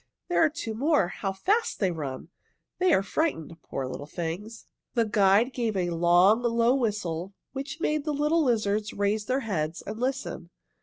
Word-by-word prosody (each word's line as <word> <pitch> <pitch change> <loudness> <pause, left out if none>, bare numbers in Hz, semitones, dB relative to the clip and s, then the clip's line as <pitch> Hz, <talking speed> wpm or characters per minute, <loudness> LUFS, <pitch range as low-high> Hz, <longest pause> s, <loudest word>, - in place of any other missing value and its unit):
There 350 - +3
are 320 - +5
two 300 -8 -5
more. 270 - +2
How 195 +1 -3
fast 410 - 0
they 190 -4 +2
run! 145 -2 -5 0.5
They 365 0 +3
are 195 - +4
frightened. 175 - -2
Poor 135 - -4
little 140 +3 -6
things!" 180 +8 -5 0.3
The 230 -2 +3
guide 210 +3 +3
gave 230 -5 -1
a 175 -2 0
long, 175 +6 +4
low 235 0 +3
whistle 200 -7 -2 0.2
which 275 +4 -5
made 305 -2 0
the 305 - -1
little 300 +3 +2
lizards 215 -4 0
raise 205 +1 0
their 260 +5 0
heads 170 -7 -2
and 215 +2 -6
listen. 260 -8 -3
215 Hz, 170 wpm, -27 LUFS, 180-265 Hz, 0.5 s, are